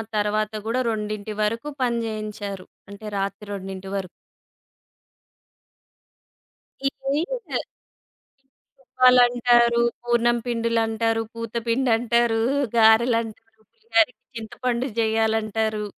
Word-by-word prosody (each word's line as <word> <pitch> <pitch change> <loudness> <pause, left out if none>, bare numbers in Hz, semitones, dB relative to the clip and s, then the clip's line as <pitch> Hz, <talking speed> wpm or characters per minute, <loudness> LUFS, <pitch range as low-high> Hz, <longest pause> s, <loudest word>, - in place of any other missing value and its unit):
తర్వాత 210 0 0
కూడా, 230 +3 0
2 215 -1 -3
వరకు 230 +6 -1
పని 240 -2 +1
చేయించారు. 210 -3 -5 0.2
అంటే, 200 +2 -10
రాత్రి 200 +1 -4
2 190 -1 -7
వరకు. 190 -2 -3 2.8
ఇడ్లీ 275 +2 -2
పిండి... - - -3 1.2
రుబ్బాలంటారు, 245 -2 +4 0.2
పూర్ణం 240 0 +2
పిండులంటారు, 225 -1 0
పూత 230 -1 -7
పిండంటారు, 235 -1 +2 0.4
గారెలంటారు, 225 0 +2
పులిహారికి 385 - 0
చింతపండు 235 +3 -3
చెయ్యాలంటారు. 220 -1 0
225 Hz, 80 wpm, -23 LUFS, 215-240 Hz, 2.8 s, రుబ్బాలంటారు